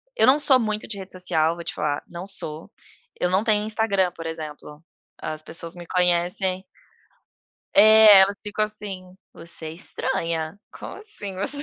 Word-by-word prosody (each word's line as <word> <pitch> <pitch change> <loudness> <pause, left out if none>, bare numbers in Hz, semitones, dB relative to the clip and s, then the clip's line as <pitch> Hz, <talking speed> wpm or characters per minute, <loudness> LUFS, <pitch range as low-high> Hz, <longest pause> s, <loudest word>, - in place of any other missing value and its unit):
eu - - +4
não 270 +3 +5
sou 270 -3 +4
muito 215 -2 -2
de 210 - -5
rede 190 -1 -9
social 165 -3 0
vou 170 - -8
te - - -4
falar, 145 -1 -2
não 175 +2 -8
sou, 160 -5 -4 0.5
eu 180 - +1
não 190 +3 +1
tenho 210 -2 +2
Instagram, 205 -4 +1
por 165 -2 -10
exemplo, 155 -1 -8 0.4
as 155 0 -4
pessoas 165 +2 -6
me 175 -1 -10
conhecem 180 +1 +1 1.1
É, 215 -1 +8
elas 200 +1 +2
ficam 210 0 -1
assim: 195 -4 -5 0.2
"você 165 -1 -9
é 155 - -6
estranha, 165 0 -3
como - - -9
assim 410 - -7
você" 285 +9 -2
185 Hz, 165 wpm, -23 LUFS, 165-210 Hz, 1.1 s, É